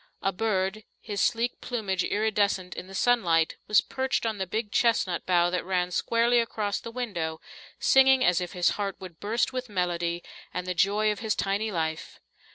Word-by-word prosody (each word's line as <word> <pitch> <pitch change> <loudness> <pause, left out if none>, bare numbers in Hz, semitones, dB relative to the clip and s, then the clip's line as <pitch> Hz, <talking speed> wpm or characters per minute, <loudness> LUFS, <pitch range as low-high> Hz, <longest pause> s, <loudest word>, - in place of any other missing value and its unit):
A 195 - +2
bird, 195 0 -1 0.2
his 205 -2 -4
sleek 235 +1 0
plumage 200 -7 -2
iridescent 205 -4 0
in 180 - -7
the 195 - -10
sunlight, 175 -9 +2
was 210 -3 +5
perched 265 +2 -2
on 220 -3 -2
the 190 - -2
big 210 +2 -3
chestnut 225 -7 +1
bough 175 -1 +3
that 180 - -1
ran 180 -1 -1
squarely 235 +5 +2
across 215 -3 -1
the - - -8
window, 195 -10 -3 0.4
singing 265 -1 +5
as 180 0 +3
if 180 - -5
his 180 -1 +2
heart 195 -1 -2
would 180 -4 -10
burst 230 +5 0
with 255 -1 -4
melody 175 -3 -1 0.3
and 180 - -2
the 180 - -2
joy 205 +4 +2
of 210 - -4
his 220 -2 -1
tiny 205 +2 -1
life. 160 -3 -3
200 Hz, 180 wpm, -27 LUFS, 180-225 Hz, 0.4 s, was